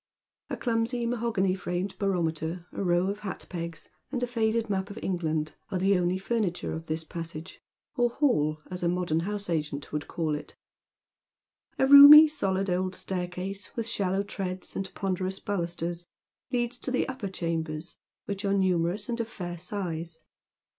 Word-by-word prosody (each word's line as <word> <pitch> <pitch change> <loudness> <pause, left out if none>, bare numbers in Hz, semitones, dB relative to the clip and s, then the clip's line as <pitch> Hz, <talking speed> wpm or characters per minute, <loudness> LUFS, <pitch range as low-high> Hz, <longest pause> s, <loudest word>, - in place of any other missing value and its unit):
A - - -3
clumsy 235 0 0
mahogany 230 -5 +1
framed 185 +1 -3
barometer, 170 -3 -1
a - - -3
row 175 0 +3
of 200 +1 -2
hat 200 -3 -6
pegs, 170 -2 -6 0.2
and 250 -3 -2
a - - +4
faded 230 -1 0
map 195 -1 -1
of 205 - -8
England 160 -4 -1 0.2
ai'e 190 - 0
the 195 0 +3
only 180 +1 +1
furniture 195 -3 -1
of 160 +1 -6
this 160 +1 -2
passage, 165 +1 -7 0.3
or 245 -2 +3
hall, 155 - +1
as 180 - -4
a 170 - +2
modem 175 -3 0
house 205 +3 -3
agent 150 -4 -3
would 150 -1 -2
call 160 -3 -1
it. 150 0 -6 1.2
A - - +4
roomy, 285 +3 +11
eohd 195 -10 0
old 185 0 -1
staircase, 185 +2 -4
with 230 - -2
shallow 195 -3 0
ti 200 - -7
eads, 185 0 -7
and 190 -1 -3
ponderous 190 -1 -2
balusters, 175 -2 -3 0.4
leads 240 0 0
to - - -3
the 255 - +1
upper 255 -7 -4
chambers, 165 -2 -3 0.3
which 200 0 -4
are 200 0 +2
numerous 185 +1 +1
and 235 0 -2
of 230 - -1
fair 175 -6 -6
size. 170 -3 -4
185 Hz, 165 wpm, -28 LUFS, 170-210 Hz, 1.2 s, roomy